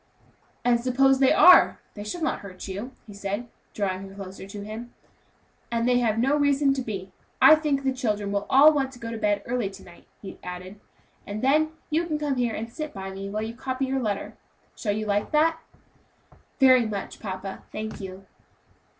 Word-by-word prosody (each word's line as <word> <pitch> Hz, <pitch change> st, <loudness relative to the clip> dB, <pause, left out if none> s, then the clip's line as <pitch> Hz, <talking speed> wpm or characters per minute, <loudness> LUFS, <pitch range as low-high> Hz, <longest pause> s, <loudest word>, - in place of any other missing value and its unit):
"And 240 Hz, -1 st, +3 dB
suppose 265 Hz, +2 st, +3 dB
they 265 Hz, -1 st, +5 dB
are! 360 Hz, +3 st, +7 dB
they 205 Hz, -, -7 dB
shall 330 Hz, +11 st, -5 dB
not 310 Hz, -, 0 dB
hurt 185 Hz, -2 st, -9 dB
you," 200 Hz, +7 st, -5 dB
he 210 Hz, -, -11 dB
said, 200 Hz, +4 st, -4 dB, 0.3 s
drawing 195 Hz, -1 st, -2 dB
her 195 Hz, -, -13 dB
closer 190 Hz, -1 st, -9 dB
to 200 Hz, 0 st, -8 dB
him; 225 Hz, +3 st, -8 dB, 0.8 s
"and 230 Hz, 0 st, 0 dB
they 250 Hz, 0 st, +4 dB
have 225 Hz, -3 st, +1 dB
no 265 Hz, +5 st, +2 dB
reason 285 Hz, -1 st, +3 dB
to 270 Hz, -, -2 dB
be. 195 Hz, -5 st, -6 dB, 0.3 s
I 310 Hz, -, +9 dB
think 300 Hz, -3 st, +1 dB
the 265 Hz, -1 st, +1 dB
children 210 Hz, -6 st, -2 dB
will 200 Hz, 0 st, -2 dB
all 295 Hz, +4 st, +7 dB
want 270 Hz, -2 st, 0 dB
to 245 Hz, -, -13 dB
go 230 Hz, -1 st, -6 dB
to 230 Hz, -, -4 dB
bed 205 Hz, -1 st, +1 dB
early 240 Hz, -4 st, -1 dB
to 195 Hz, 0 st, -13 dB
night," 175 Hz, -1 st, -16 dB
he 195 Hz, -, -10 dB
added, 180 Hz, +3 st, -8 dB, 0.5 s
"and 210 Hz, +3 st, -5 dB
then 310 Hz, +4 st, +3 dB, 0.2 s
you 330 Hz, +3 st, +1 dB
can 305 Hz, -2 st, -1 dB
come 290 Hz, -3 st, -1 dB
here 240 Hz, -2 st, 0 dB
and 230 Hz, +2 st, -6 dB
sit 305 Hz, -5 st, -6 dB
by 195 Hz, 0 st, -6 dB
me 195 Hz, +1 st, -6 dB
while 215 Hz, +2 st, -3 dB
you 225 Hz, +1 st, -5 dB
copy 260 Hz, +2 st, -3 dB
your 265 Hz, 0 st, -1 dB
letter; 205 Hz, -4 st, -3 dB, 0.4 s
shall 210 Hz, -, -2 dB
you 215 Hz, +1 st, -3 dB
like 205 Hz, 0 st, 0 dB
that?" 320 Hz, +2 st, +3 dB, 1.0 s
"Very 255 Hz, -3 st, +6 dB
much, 200 Hz, -2 st, -5 dB
papa, 190 Hz, -1 st, -6 dB
thank 215 Hz, -1 st, -6 dB
you." 190 Hz, 0 st, -8 dB
230 Hz, 200 wpm, -25 LUFS, 200-270 Hz, 1.0 s, I